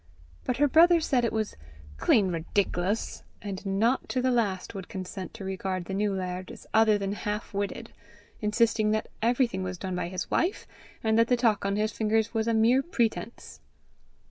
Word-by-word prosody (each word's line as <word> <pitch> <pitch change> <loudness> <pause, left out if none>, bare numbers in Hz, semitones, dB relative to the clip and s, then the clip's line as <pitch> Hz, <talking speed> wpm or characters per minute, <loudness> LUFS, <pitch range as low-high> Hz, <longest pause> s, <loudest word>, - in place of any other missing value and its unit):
But 250 - -1
her 290 - +4
brother 335 +4 +6
said 260 -6 +1
it 235 - +1
was 220 -1 -2 0.4
"clean 190 - +3
ridic'lous;" 180 +4 -1 0.2
and 195 -2 -6
not 220 +7 +1
to 255 - 0
the 255 0 +2
last 205 -6 0
would 190 -2 -7
consent 190 -1 -6
to 195 - -7
regard 190 -1 -3
the 190 - -5
new 205 +1 +1
laird 185 -1 -4
as - - -11
other 220 -1 +5
than 200 -1 -2
half 210 +1 -4
witted, 205 +3 -4 0.5
insisting 215 0 +2
that 215 - -1
everything 235 -3 +1
was 185 -1 -4
done 185 0 -4
by 180 - -2
his 185 +1 -5
wife, 355 +4 0 0.4
and 220 0 +3
that 230 - +5
the 245 - +3
talk 220 -5 +2
on 200 - 0
his 215 +1 0
fingers 220 +1 0
was 225 0 0
a 230 - +2
mere 235 +4 +4
pretence. 235 -6 -2
215 Hz, 185 wpm, -28 LUFS, 190-230 Hz, 0.5 s, brother